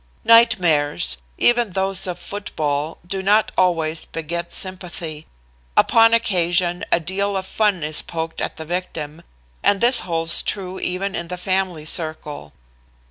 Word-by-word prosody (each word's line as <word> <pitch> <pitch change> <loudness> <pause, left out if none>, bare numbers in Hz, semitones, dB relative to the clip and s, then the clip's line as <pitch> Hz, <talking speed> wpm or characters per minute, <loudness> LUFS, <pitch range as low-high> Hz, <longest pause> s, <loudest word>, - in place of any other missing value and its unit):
Nightmares, 180 - +4 0.2
even 240 -5 +3
those 190 0 0
of 180 -1 -4
football, 155 -6 -3
do 190 +2 -3
not 210 +3 +3
always 165 -3 +2
beget 170 +2 -5
sympathy. 175 -5 -3 0.5
Upon 225 0 +5
occasion 175 -5 +1
a - - +4
deal 195 +4 -1
of 190 - -4
fun 205 -5 0
is 150 0 +1
poked 165 -1 -5
at - - -3
the 160 - -6
victim, 165 -3 -4 0.4
and 200 - +3
this 240 +2 +5
holds 165 -1 -1
true 190 -2 -4
even 190 +2 -2
in 170 - -4
the 180 +1 -5
family 185 -3 -1
circle. 155 - -3
180 Hz, 135 wpm, -21 LUFS, 160-195 Hz, 0.5 s, Upon